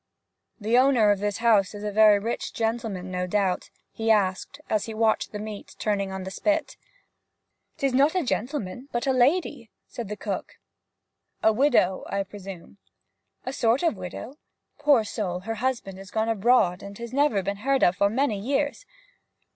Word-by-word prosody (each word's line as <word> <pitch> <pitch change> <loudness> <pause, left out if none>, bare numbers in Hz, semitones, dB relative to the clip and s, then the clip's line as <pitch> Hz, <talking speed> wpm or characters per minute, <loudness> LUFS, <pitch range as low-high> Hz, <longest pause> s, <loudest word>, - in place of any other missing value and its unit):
'The 220 +2 +1
owner 255 -6 +4
of 200 - +1
this 205 0 -1
house 215 -4 +3
is 205 - -7
a 210 - -2
very 215 0 +6
rich 225 +4 -4
gentleman, 225 -5 -2
no 180 0 -2
doubt?' 190 -1 0 0.2
he 225 0 -3
asked, 205 +5 +1
as 215 -2 0
he 225 - -6
watched 220 0 +1
the 210 - -5
meat 210 -1 -8
turning 200 -2 -1
on 190 0 -5
the 190 - -6
spit. 310 - -1 1.0
''Tis 275 -2 0
not 280 +6 +3
a 365 - +2
gentleman, 245 -1 -3
but 240 +2 -2
a 265 - +2
lady,' 255 -2 +1 0.2
said 235 -5 -7
the 210 - -5
cook. - - -4 0.9
'A 220 - +5
widow, 215 -7 +2
I 200 0 -1
presume?' 195 -1 -11 0.7
'A 255 - -3
sort 240 +4 +2
of 330 -8 +2
widow. 190 - -8 0.4
Poor 290 -6 +4
soul, 190 -4 -3
her 225 +2 -5
husband 235 -7 -2
is 195 -1 -11
gone 220 +2 -1
abroad, 215 -4 +3
and 200 0 -9
has 235 +1 -8
never 275 -8 +2
been 200 +2 -2
heard 270 +5 +1
of 180 +1 +4
for 200 - +3
many 230 -2 0
years.' 285 - -1
220 Hz, 175 wpm, -25 LUFS, 200-255 Hz, 1.0 s, very